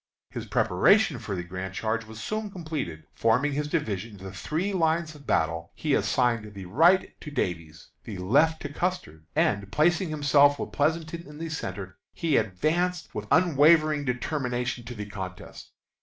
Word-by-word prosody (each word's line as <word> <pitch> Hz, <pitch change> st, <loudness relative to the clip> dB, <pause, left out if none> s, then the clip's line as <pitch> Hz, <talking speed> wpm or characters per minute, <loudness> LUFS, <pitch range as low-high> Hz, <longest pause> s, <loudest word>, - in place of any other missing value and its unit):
His -, -, -6 dB
preparation 160 Hz, -, +3 dB
for 110 Hz, -3 st, -4 dB
the 90 Hz, -, -3 dB
grand 95 Hz, +2 st, -6 dB
charge 110 Hz, +1 st, -1 dB
was 110 Hz, 0 st, -10 dB
soon 215 Hz, -, -3 dB
completed. 155 Hz, -, -5 dB
Forming 125 Hz, +6 st, +2 dB
his 145 Hz, +1 st, -1 dB
division 115 Hz, -, -2 dB
into 95 Hz, -1 st, -9 dB
three 180 Hz, -, -2 dB
lines 165 Hz, -2 st, +1 dB
of 145 Hz, -2 st, -15 dB
battle, 85 Hz, +1 st, 0 dB
he -, -, -1 dB
assigned 115 Hz, -4 st, +1 dB
the 95 Hz, -1 st, -7 dB
right 165 Hz, -, +4 dB
to 150 Hz, -, -7 dB
Davies, 85 Hz, -, -4 dB
the 105 Hz, -4 st, -7 dB
left 145 Hz, -, +2 dB
to 145 Hz, -1 st, -5 dB
Custer, 145 Hz, -, -3 dB
and, 100 Hz, -1 st, +1 dB
placing 175 Hz, -, +2 dB
himself 145 Hz, -1 st, +4 dB
with -, -, -5 dB
Pleasonton 165 Hz, +3 st, -1 dB
in 150 Hz, 0 st, -11 dB
the 165 Hz, +1 st, -5 dB
centre, 95 Hz, -, -5 dB
he 165 Hz, -4 st, 0 dB
advanced 165 Hz, -, 0 dB
with 105 Hz, 0 st, -5 dB
unwavering 155 Hz, -2 st, +5 dB
determination 125 Hz, -1 st, -2 dB
to 120 Hz, +1 st, -7 dB
the 105 Hz, -1 st, -5 dB
contest. 95 Hz, -2 st, -8 dB
140 Hz, 160 wpm, -27 LUFS, 100-160 Hz, -, unwavering